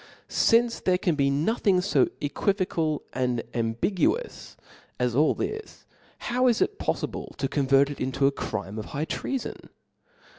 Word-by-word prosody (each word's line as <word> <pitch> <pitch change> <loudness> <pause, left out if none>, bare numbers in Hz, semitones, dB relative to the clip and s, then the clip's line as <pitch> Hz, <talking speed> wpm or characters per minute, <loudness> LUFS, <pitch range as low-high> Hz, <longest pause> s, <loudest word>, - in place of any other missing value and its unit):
Since 235 +1 +3
there 185 -1 +2
can 180 -2 +1
be 140 -2 +2
no 150 +10 +1
thing 195 -5 +2
fo 200 - +3
equivocal 160 -1 0
and 125 -2 0
ambiguous 145 - -1 0.4
as 125 -1 +1
all 150 +5 +3
this; 435 0 -5 0.3
how 250 +1 +1
is 235 -3 +3
it 415 - 0
poflible - - -3
to 135 - -1
convert 140 0 +3
it 145 - -8
into 130 +1 0
a 140 - +5
crirne 110 -5 -4
of 105 - -5
high 150 +2 -3
treafon 270 +9 -4
150 Hz, 150 wpm, -26 LUFS, 135-210 Hz, 0.4 s, a